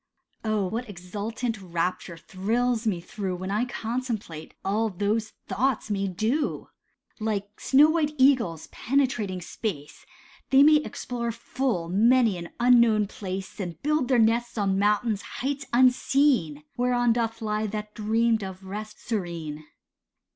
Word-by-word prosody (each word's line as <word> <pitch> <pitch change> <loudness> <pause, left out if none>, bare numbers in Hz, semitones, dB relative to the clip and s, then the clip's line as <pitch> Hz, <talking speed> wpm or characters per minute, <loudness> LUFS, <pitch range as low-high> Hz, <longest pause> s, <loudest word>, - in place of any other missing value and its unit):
Oh, 215 -3 0
what 225 +5 -4
exultant 210 +5 -4
rapture 175 -1 -3
thrills 225 +7 -1
me 190 -5 +1
through 190 +1 -4
When 185 +2 -5
I 215 +4 +1
contemplate 230 -9 -4
all 215 +3 +1
those 210 +3 -1
thoughts 255 -2 -1
may 195 -1 0
do; 225 - -1 0.5
Like 210 -1 -3
snow 295 +3 +5
white 305 -2 0
eagles 250 - +3
penetrating 235 -8 0
space, 160 -5 -6 0.4
They 270 +1 +7
may 305 +1 +7
explore 245 -5 -3
full 230 -6 -2
many 225 +4 +4
an 170 - -7
unknown 235 -3 +5
place, 195 -1 -6
And 175 -4 -5
build 300 -3 +1
their 255 - +3
nests 235 +1 +2
on 195 -2 +1
mountain 210 +2 +2
heights 275 +1 -4
unseen, 250 - +3
Whereon 245 -1 +2
doth 230 -1 -1
lie 215 -1 -1
that 210 0 -5
dreamed 225 0 +1
of 190 0 -8
rest 210 +2 -7
serene. 170 -8 -4
220 Hz, 135 wpm, -26 LUFS, 195-245 Hz, 0.5 s, They